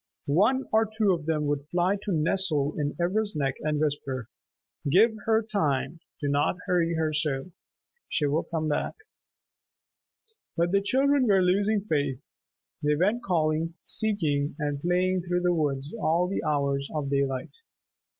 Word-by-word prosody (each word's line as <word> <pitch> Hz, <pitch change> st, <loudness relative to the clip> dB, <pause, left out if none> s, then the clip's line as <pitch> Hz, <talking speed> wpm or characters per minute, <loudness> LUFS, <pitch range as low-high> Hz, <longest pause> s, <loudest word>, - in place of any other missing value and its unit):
One 210 Hz, -, +2 dB
or 220 Hz, 0 st, +3 dB
two 210 Hz, -4 st, +3 dB
of 165 Hz, -3 st, -4 dB
them 155 Hz, -2 st, 0 dB
would 145 Hz, 0 st, -2 dB
fly 175 Hz, +4 st, +1 dB
to 205 Hz, 0 st, -5 dB
nestle 155 Hz, -3 st, +2 dB
in 145 Hz, -1 st, -1 dB
Ivra's 205 Hz, +3 st, 0 dB
neck 135 Hz, -3 st, 0 dB
and 150 Hz, -1 st, -1 dB
whisper, 140 Hz, -5 st, -2 dB, 0.6 s
"Give 215 Hz, +9 st, +5 dB
her 225 Hz, 0 st, +3 dB
time. 165 Hz, -, -1 dB, 0.2 s
Do 145 Hz, -, -2 dB
not 145 Hz, +4 st, +1 dB
hurry 170 Hz, -2 st, +1 dB
her 160 Hz, -1 st, 0 dB
so. 150 Hz, +1 st, -1 dB, 0.6 s
She 150 Hz, -, +1 dB
will 145 Hz, +3 st, +1 dB
come 160 Hz, -2 st, -3 dB
back." 150 Hz, -, -1 dB, 1.6 s
But 170 Hz, +1 st, +1 dB
the 200 Hz, 0 st, +3 dB
children 270 Hz, +5 st, +2 dB
were 195 Hz, -3 st, +4 dB
losing 200 Hz, +3 st, +2 dB
faith. 145 Hz, -, -2 dB, 0.5 s
They 150 Hz, 0 st, +2 dB
went 205 Hz, +9 st, +1 dB
calling, 165 Hz, -3 st, 0 dB
seeking 155 Hz, -11 st, 0 dB
and 145 Hz, -2 st, -2 dB
playing 180 Hz, +2 st, +1 dB
through 180 Hz, 0 st, -1 dB
the 180 Hz, 0 st, +2 dB
woods 145 Hz, -3 st, -1 dB
all 180 Hz, -5 st, +1 dB
the 195 Hz, -, -2 dB
hours 140 Hz, -2 st, 0 dB
of 140 Hz, -2 st, -2 dB
daylight. 135 Hz, -2 st, -1 dB
160 Hz, 150 wpm, -27 LUFS, 145-195 Hz, 1.6 s, Give